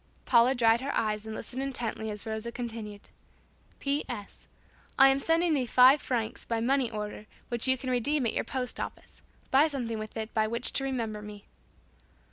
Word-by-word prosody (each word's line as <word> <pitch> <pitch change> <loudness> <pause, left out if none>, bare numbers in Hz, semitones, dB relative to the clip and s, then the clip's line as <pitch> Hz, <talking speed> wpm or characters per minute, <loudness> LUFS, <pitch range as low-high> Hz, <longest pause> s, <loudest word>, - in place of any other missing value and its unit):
Paula 240 +3 +5
dried 230 -1 +4
her 275 - -2
eyes 215 0 -1
and 220 - -5
listened 255 +4 -5
intently 240 -5 -2
as 210 -1 -3
Rosa 220 +1 -4
continued, 225 -4 -7 0.7
"P. 280 +1 0
S. 205 - -8 0.5
I 270 0 +8
am 270 0 +2
sending 330 +3 +2
thee 260 -4 0
five 255 +4 +6
francs 230 -4 -2
by 230 -1 -2
money 255 +1 +1
order 210 -1 -6 0.2
which 240 +1 0
you 260 0 +3
can 255 0 -4
redeem 255 +3 +1
at 230 - 0
your - - 0
post 255 -2 -3
office. - - -7 0.3
Buy 280 +4 +6
something 240 -7 -3
with 215 +1 -7
it 220 0 -5
by 215 -1 +2
which 235 +2 -2
to 270 - 0
remember 230 -6 -3
me." 210 -1 -10
235 Hz, 185 wpm, -29 LUFS, 220-265 Hz, 0.7 s, I